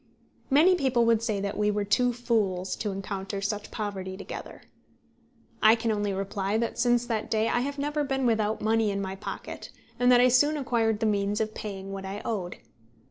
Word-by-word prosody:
Many 315 Hz, +7 st, +6 dB
people 265 Hz, -8 st, +2 dB
would 230 Hz, -1 st, +3 dB
say 220 Hz, -3 st, -1 dB
that 200 Hz, 0 st, -3 dB
we 210 Hz, 0 st, +2 dB
were 205 Hz, 0 st, 0 dB
two 245 Hz, +5 st, +2 dB
fools 210 Hz, -7 st, -1 dB
to 210 Hz, -, -2 dB
encounter 195 Hz, 0 st, -4 dB
such 205 Hz, +1 st, -3 dB
poverty 190 Hz, -3 st, -5 dB
together. 195 Hz, -, -8 dB, 1.0 s
I 220 Hz, +1 st, +7 dB
can 230 Hz, -1 st, -1 dB
only 205 Hz, -1 st, -1 dB
reply 195 Hz, +1 st, -2 dB
that 230 Hz, 0 st, -2 dB
since 240 Hz, 0 st, +3 dB
that 225 Hz, -3 st, -2 dB
day 220 Hz, 0 st, +1 dB
I 240 Hz, -, +1 dB
have 280 Hz, +3 st, -3 dB
never 295 Hz, +1 st, -1 dB
been 270 Hz, -2 st, -1 dB
without 220 Hz, -2 st, +1 dB
money 220 Hz, 0 st, +2 dB
in 200 Hz, 0 st, -2 dB
my 190 Hz, -1 st, -4 dB
pocket, 195 Hz, -, -7 dB, 0.3 s
and 245 Hz, 0 st, +5 dB
that 245 Hz, -, +7 dB
I 250 Hz, -, +6 dB
soon 290 Hz, +5 st, +4 dB
acquired 225 Hz, -5 st, 0 dB
the -, -, +2 dB
means 205 Hz, -1 st, +1 dB
of 215 Hz, -1 st, -1 dB
paying 195 Hz, -2 st, -6 dB
what 195 Hz, 0 st, -5 dB
I 195 Hz, +2 st, -6 dB
owed. 190 Hz, -6 st, -3 dB
215 Hz, 195 wpm, -27 LUFS, 200-240 Hz, 1.0 s, I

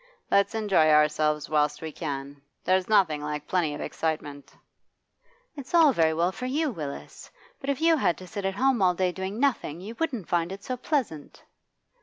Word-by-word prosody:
Let's 200 Hz, +3 st, +3 dB
enjoy 200 Hz, -8 st, +3 dB
ourselves 150 Hz, 0 st, +3 dB
whilst 150 Hz, -1 st, +1 dB
we 160 Hz, -, -4 dB
can. 140 Hz, -3 st, -6 dB, 0.2 s
There's 185 Hz, +1 st, +1 dB
nothing 175 Hz, -8 st, +3 dB
like 150 Hz, 0 st, -4 dB
plenty 165 Hz, -5 st, 0 dB
of -, -, -7 dB
excitement.' 150 Hz, -3 st, -4 dB, 1.0 s
'It's 280 Hz, +3 st, -5 dB
all 320 Hz, -5 st, +6 dB
very 160 Hz, -5 st, +3 dB
well 170 Hz, +3 st, +1 dB
for 250 Hz, +6 st, -5 dB
you, 295 Hz, +3 st, 0 dB
Willis. 150 Hz, -9 st, -8 dB, 0.3 s
But 275 Hz, -, -5 dB
if 280 Hz, +1 st, -1 dB
you 330 Hz, 0 st, +4 dB
had 180 Hz, -, +1 dB
to 185 Hz, -, -10 dB
sit 200 Hz, +2 st, -6 dB
at 195 Hz, 0 st, -1 dB
home 260 Hz, 0 st, +2 dB
all 180 Hz, -1 st, +3 dB
day 185 Hz, 0 st, +1 dB
doing 190 Hz, +4 st, -5 dB
nothing, 250 Hz, -, 0 dB
you 205 Hz, +5 st, -8 dB
wouldn't 260 Hz, -, -2 dB
find 170 Hz, 0 st, 0 dB
it 195 Hz, +1 st, -8 dB
so 255 Hz, -, -3 dB
pleasant. 245 Hz, -, -3 dB
185 Hz, 185 wpm, -26 LUFS, 150-235 Hz, 1.0 s, all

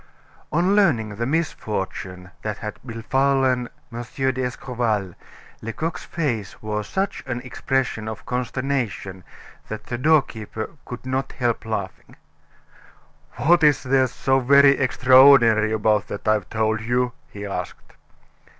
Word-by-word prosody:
On 180 Hz, +5 st, +2 dB
learning 145 Hz, -, +3 dB
the 120 Hz, +1 st, -1 dB
misfortune 95 Hz, -, -3 dB
that 105 Hz, -1 st, -4 dB
had 105 Hz, -1 st, -7 dB
befallen 130 Hz, +1 st, +1 dB, 0.2 s
M. 120 Hz, -, -4 dB
d'Escorval, 120 Hz, -5 st, -2 dB, 0.5 s
Lecoq's 155 Hz, +9 st, -4 dB
face 120 Hz, -, -3 dB
wore 105 Hz, 0 st, -3 dB
such 195 Hz, -, -2 dB
an 120 Hz, -1 st, -2 dB
expression 125 Hz, -3 st, -2 dB
of 110 Hz, -1 st, -7 dB
consternation 125 Hz, -7 st, -3 dB, 0.4 s
that 110 Hz, -, -6 dB
the 120 Hz, -, -4 dB
doorkeeper 125 Hz, -7 st, 0 dB
could 125 Hz, +1 st, -8 dB
not 130 Hz, +1 st, -2 dB
help 120 Hz, -3 st, -1 dB
laughing. 100 Hz, -4 st, -5 dB, 1.2 s
"What 160 Hz, +8 st, +3 dB
is 150 Hz, -1 st, +4 dB
there 130 Hz, 0 st, +3 dB
so 135 Hz, +2 st, +1 dB
very 140 Hz, +2 st, +6 dB
extraordinary 130 Hz, -4 st, +6 dB
about 105 Hz, -1 st, +1 dB
that 100 Hz, -, -7 dB
I've 110 Hz, -3 st, +1 dB
told 110 Hz, 0 st, 0 dB
you?" 125 Hz, +2 st, 0 dB, 0.2 s
he 105 Hz, 0 st, -8 dB
asked. 100 Hz, -, -6 dB
120 Hz, 120 wpm, -23 LUFS, 110-135 Hz, 1.2 s, very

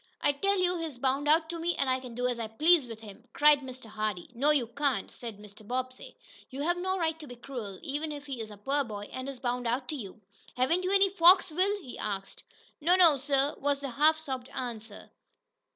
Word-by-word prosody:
"I 290 Hz, -, +3 dB
tell 395 Hz, +8 st, +1 dB
you 360 Hz, -1 st, +1 dB
he's 320 Hz, -6 st, -5 dB
bound 270 Hz, +3 st, 0 dB
out 320 Hz, +2 st, +4 dB
to 340 Hz, -, -5 dB
me, 340 Hz, +1 st, -1 dB
and 275 Hz, -, 0 dB
I 260 Hz, 0 st, +1 dB
can 250 Hz, -3 st, -10 dB
do 250 Hz, +1 st, -2 dB
as 245 Hz, -1 st, -2 dB
I 225 Hz, -, -3 dB
please 305 Hz, +5 st, +3 dB
with 225 Hz, -1 st, -9 dB
him!" 205 Hz, -3 st, -12 dB
cried 295 Hz, 0 st, +6 dB
Mr. 260 Hz, -2 st, -9 dB
Hardee. 215 Hz, -3 st, -4 dB
"No, 270 Hz, +5 st, +1 dB
you 290 Hz, -5 st, +3 dB
can't," 260 Hz, -2 st, -1 dB
said 230 Hz, -4 st, -8 dB
Mr. 210 Hz, 0 st, -14 dB
Bobbsey. 255 Hz, +1 st, -5 dB, 0.3 s
"You 275 Hz, +2 st, -5 dB
have 345 Hz, +3 st, +1 dB
no 375 Hz, +1 st, -1 dB
right 325 Hz, -2 st, -1 dB
to 305 Hz, -, -10 dB
be 245 Hz, -, -9 dB
cruel, 235 Hz, -6 st, -7 dB
even 295 Hz, +3 st, -3 dB
if 290 Hz, -1 st, -7 dB
he 265 Hz, -5 st, -5 dB
is 220 Hz, -, -7 dB
a 210 Hz, -, -11 dB
poor 275 Hz, +7 st, 0 dB
boy, 205 Hz, -4 st, -7 dB
and 260 Hz, +1 st, -5 dB
is 270 Hz, -2 st, -8 dB
bound 245 Hz, -1 st, -2 dB
out 250 Hz, +2 st, -1 dB
to 310 Hz, -, -2 dB
you. 215 Hz, -6 st, -8 dB, 0.4 s
Haven't 320 Hz, +9 st, +2 dB
you 370 Hz, -, -1 dB
any 395 Hz, 0 st, +5 dB
folks, 360 Hz, -1 st, +6 dB
Will?" 390 Hz, +5 st, +1 dB
he 250 Hz, -, -9 dB
asked. 195 Hz, -2 st, -5 dB, 0.4 s
"No 345 Hz, +4 st, +4 dB
no, 335 Hz, -6 st, +6 dB
sir," 275 Hz, +1 st, +1 dB
was 285 Hz, 0 st, 0 dB
the 275 Hz, -2 st, -5 dB
half 305 Hz, +5 st, +4 dB
sobbed 265 Hz, -5 st, -6 dB
answer. 230 Hz, -4 st, -6 dB
270 Hz, 230 wpm, -29 LUFS, 240-315 Hz, 0.4 s, cried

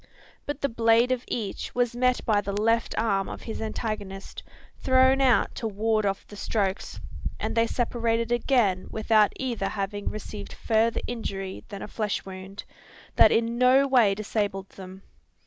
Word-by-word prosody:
But 290 Hz, 0 st, -4 dB
the 280 Hz, -, +2 dB
blade 230 Hz, +1 st, +3 dB
of 255 Hz, -1 st, 0 dB
each 215 Hz, -5 st, -4 dB
was 245 Hz, -1 st, +1 dB
met 250 Hz, 0 st, +1 dB
by 210 Hz, -2 st, +3 dB
the 200 Hz, 0 st, -3 dB
left 230 Hz, +2 st, +1 dB
arm 200 Hz, -4 st, +1 dB
of -, -, -8 dB
his 225 Hz, -, -5 dB
antagonist, 215 Hz, -3 st, -5 dB, 0.4 s
thrown 260 Hz, +1 st, +4 dB
out 255 Hz, -3 st, +3 dB
to 230 Hz, -, -3 dB
ward 215 Hz, 0 st, 0 dB
off 195 Hz, 0 st, -2 dB
the 205 Hz, -, -12 dB
strokes 200 Hz, -2 st, -2 dB, 0.4 s
and -, -, -2 dB
they 230 Hz, 0 st, +3 dB
separated 230 Hz, -1 st, -1 dB
again 240 Hz, -6 st, +2 dB
without 220 Hz, -1 st, +3 dB
either 235 Hz, -7 st, -2 dB
having 205 Hz, 0 st, -3 dB
received 210 Hz, -1 st, -7 dB
further 225 Hz, 0 st, +1 dB
injury 195 Hz, -5 st, -5 dB
than 200 Hz, -3 st, -7 dB
a -, -, -6 dB
flesh 210 Hz, -1 st, -2 dB
wound, 190 Hz, +1 st, -8 dB, 0.5 s
that -, -, +7 dB
in 230 Hz, +1 st, +1 dB
no 260 Hz, +2 st, +5 dB
way 235 Hz, -7 st, +4 dB
disabled 205 Hz, -2 st, -2 dB
them. 190 Hz, 0 st, -11 dB
220 Hz, 160 wpm, -26 LUFS, 200-240 Hz, 0.5 s, that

